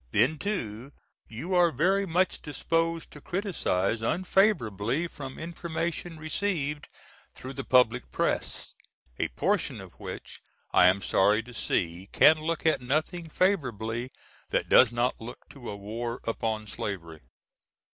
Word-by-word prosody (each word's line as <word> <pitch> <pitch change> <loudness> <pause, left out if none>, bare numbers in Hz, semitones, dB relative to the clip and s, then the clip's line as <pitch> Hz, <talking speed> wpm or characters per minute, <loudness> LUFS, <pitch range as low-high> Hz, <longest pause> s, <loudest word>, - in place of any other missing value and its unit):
Then 130 - +2
too 135 - -4 0.3
you 140 +12 -5
are 175 -1 +5
very 190 +8 +2
much 180 +2 +1
disposed 165 +3 -1
to 150 - -11
criticise 115 - -1
unfavorably 150 - +2
from 135 -5 -8
information 170 0 -4
received 155 -3 -2 0.5
through 130 +1 -8
the 135 0 -5
public 125 -1 +3
press, - - -1 0.5
a - - +1
portion - - 0
of - - -11
which - - -8 0.3
I 90 - +7
am 95 +1 +3
sorry 105 +5 +3
to 125 +2 -12
see 90 -3 -2
can 155 - +7
look 165 +1 -2
at 160 -4 +3
nothing 155 +6 -1
favorably 125 - 0 0.4
that - - 0
does 125 -3 +7
not 120 +1 0
look 120 +2 -9
to 130 -4 -9
a 100 - -5
war 115 +4 -4
upon 110 -1 -2
slavery. 85 -6 -5
135 Hz, 135 wpm, -28 LUFS, 110-165 Hz, 0.5 s, I